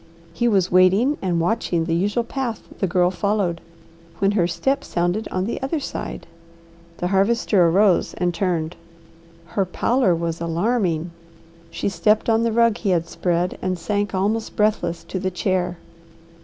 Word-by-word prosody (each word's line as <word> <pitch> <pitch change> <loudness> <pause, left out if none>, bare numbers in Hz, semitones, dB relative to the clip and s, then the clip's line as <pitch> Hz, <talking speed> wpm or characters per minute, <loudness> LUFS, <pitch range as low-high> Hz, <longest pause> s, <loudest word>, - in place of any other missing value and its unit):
He 240 +8 0
was 195 -5 +2
waiting 190 +10 +4
and 180 -3 0
watching 175 -2 0
the 165 - -1
usual 205 +7 +1
path 240 -2 -4
the 195 - +1
Girl 180 0 +2
followed, 195 -4 -1 0.6
when 195 +2 +2
her 185 -5 +2
step 270 +11 -1
sounded 175 +3 -1
on 185 0 -2
the 235 - -4
other 270 +4 -1
side. 275 - -6 0.7
The 180 - -2
Harvester 195 -2 +3
arose 190 +2 +3
and 175 0 0
turned. 170 -2 -1 0.7
Her 195 +4 -1
pallor 190 +2 +1
was 165 0 -3
alarming. 170 -1 0 0.6
She - - -3
stepped 210 +5 +2
on 225 0 +3
the 230 0 +1
rug 230 -1 +3
he 210 - -2
had 170 -2 +1
spread, 175 +1 -1
and 185 -1 -1
sank 205 +3 -2
almost 210 +4 -1
breathless 175 -6 0
to 190 - -5
the 190 0 -1
chair. 180 -1 -1
190 Hz, 155 wpm, -22 LUFS, 175-215 Hz, 0.7 s, waiting